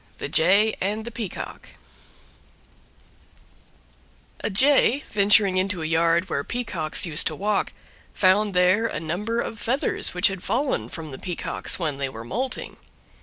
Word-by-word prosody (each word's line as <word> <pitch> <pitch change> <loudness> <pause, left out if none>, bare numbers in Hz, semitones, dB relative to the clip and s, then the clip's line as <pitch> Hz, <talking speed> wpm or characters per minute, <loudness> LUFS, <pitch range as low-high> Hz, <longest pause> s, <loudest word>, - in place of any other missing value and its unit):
THE - - -5
JAY 200 +6 +3
AND 210 +3 -2
THE 235 - -7
PEACOCK 220 -5 -7 2.7
A - - -2
jay 275 +5 +4
venturing 200 -2 +4
into 185 -2 0
a - - -3
yard 165 +2 +1
where 140 -5 -3
Peacocks 200 -11 -2
used 160 -1 +4
to - - -2
walk, 205 0 -1 0.4
found 195 +1 +2
there 185 +5 +3
a - - -5
number 195 +9 -3
of 225 - -6
feathers 255 -6 +2
which 180 - +3
had 190 -2 +2
fallen 240 - -2
from 160 0 -8
the 130 - -9
Peacocks 180 -2 -3
when 155 -6 -3
they 135 -1 -2
were 115 -3 -9
moulting. 255 - -4
190 Hz, 145 wpm, -23 LUFS, 165-220 Hz, 2.7 s, jay